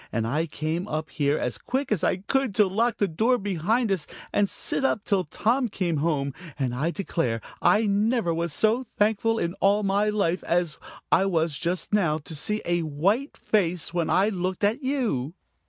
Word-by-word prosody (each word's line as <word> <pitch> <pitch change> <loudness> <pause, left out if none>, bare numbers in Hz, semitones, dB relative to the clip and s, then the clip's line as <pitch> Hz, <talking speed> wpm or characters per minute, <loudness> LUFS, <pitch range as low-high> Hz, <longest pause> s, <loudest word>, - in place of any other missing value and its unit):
And 115 -1 -1
I 150 +8 0
came 160 +5 -3
up 155 -5 -3
here 145 -1 +1
as 125 - -2
quick 265 +1 -2
as 200 -7 +1
I - - +2
could, 245 +3 -1
to 210 - +5
lock 220 +4 0
the 200 - +2
door 225 +9 +2
behind 205 +3 0
us 185 -6 -1 0.3
and 205 -1 +2
sit - - -1
up 220 -6 +1
till 195 -3 +1
Tom 235 - 0
came 175 -5 -1
home, 140 -3 0 0.2
and 130 -4 -1
I 145 +7 0
declare, 165 - -1 0.2
I 215 +1 +4
never 205 -2 +1
was 170 0 -2
so 225 - +1
thankful 220 +2 +2
in 170 -4 -1
all 200 +2 +3
my 200 +2 +2
life 200 -4 0
as 170 -2 0 0.3
I 190 +3 +4
was 165 -4 0
just 175 +6 -2
now 170 -7 +2
to 160 +1 -10
see 210 +8 -1
a 175 0 +1
white 185 - 0
face 180 -6 0
when 170 -2 0
I 195 +3 +3
looked 185 -1 -3
at 220 +7 +2
you!" 230 - -1
190 Hz, 190 wpm, -26 LUFS, 160-215 Hz, 0.3 s, to